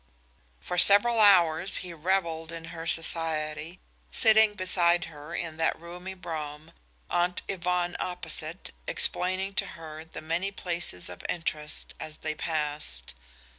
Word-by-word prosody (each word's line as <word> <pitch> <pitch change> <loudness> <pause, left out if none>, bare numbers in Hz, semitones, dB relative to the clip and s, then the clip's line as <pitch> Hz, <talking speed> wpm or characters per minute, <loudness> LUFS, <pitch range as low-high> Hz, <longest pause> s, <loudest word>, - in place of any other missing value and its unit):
For 180 - -1
several 215 +5 +6
hours 180 -3 +5
he 175 - -5
reveled 165 -1 -1
in 165 -1 -7
her 165 0 -6
society, 160 0 0 0.3
sitting 220 -2 +5
beside 175 -2 +3
her 150 +2 -9
in 165 -3 -4
that 160 - +1
roomy 180 +3 -7
brougham, 155 -3 -6 0.4
Aunt 175 +1 +1
Yvonne 180 -1 0
opposite, 170 -1 -3 0.2
explaining 185 +2 +1
to - - +1
her 155 -1 -8
the 160 - -9
many 170 +5 -1
places 175 - -4
of 90 - -9
interest 150 -3 -3
as 155 0 -7
they 155 - -3
passed. 150 - -2
170 Hz, 130 wpm, -28 LUFS, 155-180 Hz, 0.4 s, several